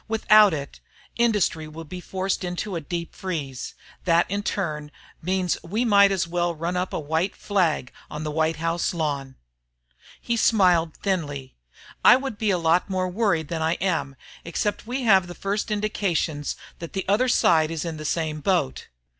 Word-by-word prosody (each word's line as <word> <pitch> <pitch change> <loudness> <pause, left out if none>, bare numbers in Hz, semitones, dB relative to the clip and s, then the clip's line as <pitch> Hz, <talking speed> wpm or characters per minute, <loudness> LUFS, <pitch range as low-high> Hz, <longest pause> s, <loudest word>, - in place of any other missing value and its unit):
Without 215 -2 +6
it, 140 -3 -5 0.4
industry 210 -9 +1
will 160 +2 -8
be 180 +3 -8
forced 190 +1 -2
into 180 +2 -3
a 165 - -2
deep 170 +2 -5
freeze. 145 -9 -5 0.3
That 170 -1 +4
in 200 +1 0
turn 155 -8 -3 0.3
means 185 0 0
we 215 +8 -1
might 200 -3 +6
as 185 -3 0
well 175 0 -1
run 170 +3 -3
up 180 +1 -1
a - - -2
white 160 +5 -1
flag 175 -10 0 0.2
on 150 - -5
the 155 - -3
White 160 +1 +1
House 165 +2 -1
lawn." 140 -5 -2 0.8
He 235 - -1
smiled 180 -8 +3
thinly. 145 -9 -2 0.5
"I - - +9
would 265 -5 -4
be 220 - +1
a 185 - +3
lot 170 +3 +2
more 185 -1 -1
worried 180 -6 0
than 165 -2 -3
I 160 +1 +2
am 170 -7 -1 0.3
except 205 +6 -2
we 255 +2 -2
have 190 -6 +5
the 175 - -8
first 200 +2 -2
indications 195 -8 -1 0.2
that 170 - -8
the 190 - -2
other 210 +6 +3
side 160 -10 +4
is 165 0 -3
in 165 -2 -4
the 155 - -7
same 155 0 -1
boat. 165 - 0
175 Hz, 175 wpm, -24 LUFS, 160-200 Hz, 0.8 s, I